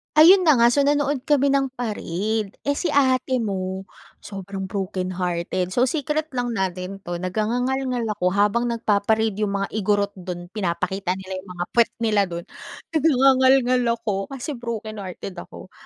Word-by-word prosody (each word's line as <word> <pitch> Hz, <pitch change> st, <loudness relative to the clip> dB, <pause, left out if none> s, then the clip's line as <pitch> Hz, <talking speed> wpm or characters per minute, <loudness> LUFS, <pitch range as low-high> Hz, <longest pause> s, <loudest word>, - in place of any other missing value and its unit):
Ayun 360 Hz, +5 st, +8 dB
na 305 Hz, -8 st, +5 dB
nga, 235 Hz, -, +7 dB
so 280 Hz, +4 st, +3 dB
nanood 285 Hz, -1 st, +1 dB
kami 280 Hz, -2 st, +3 dB
ng 275 Hz, -1 st, +1 dB
parade. 215 Hz, -3 st, -2 dB, 0.2 s
Eh, 285 Hz, -, +2 dB
si 330 Hz, +1 st, -1 dB
ate 260 Hz, -2 st, +2 dB
mo 190 Hz, -3 st, -3 dB, 0.3 s
sobrang 195 Hz, -1 st, -6 dB
brokenhearted. 185 Hz, -2 st, -2 dB
So, 250 Hz, +4 st, +2 dB
secret 300 Hz, +2 st, -1 dB
lang 245 Hz, -1 st, -1 dB
natin 190 Hz, -2 st, -3 dB
'to. 175 Hz, -2 st, -5 dB
Nag-ngangangalngal 245 Hz, +7 st, -1 dB, 0.2 s
ako 180 Hz, -, +2 dB
habang 210 Hz, +4 st, +2 dB
nagpa-parade 220 Hz, -1 st, +1 dB
'yung 205 Hz, -2 st, 0 dB
mga 195 Hz, 0 st, -2 dB
Igorot 205 Hz, -1 st, +1 dB
dun, 175 Hz, 0 st, -7 dB
pinapakita 190 Hz, -1 st, -2 dB
nila 190 Hz, 0 st, -6 dB
'yung 185 Hz, 0 st, -13 dB
mga 175 Hz, -, -2 dB
pwet 235 Hz, -1 st, +3 dB
nila 215 Hz, -2 st, +3 dB
dun, 170 Hz, 0 st, -6 dB, 0.5 s
nag 315 Hz, -2 st, 0 dB
nagngangalngal 260 Hz, -2 st, +4 dB
ako 215 Hz, -3 st, -3 dB, 0.2 s
kasi 270 Hz, +4 st, -5 dB
brokenhearted 220 Hz, -7 st, -6 dB
ako. 185 Hz, -, -11 dB
215 Hz, 150 wpm, -23 LUFS, 190-260 Hz, 0.5 s, Ayun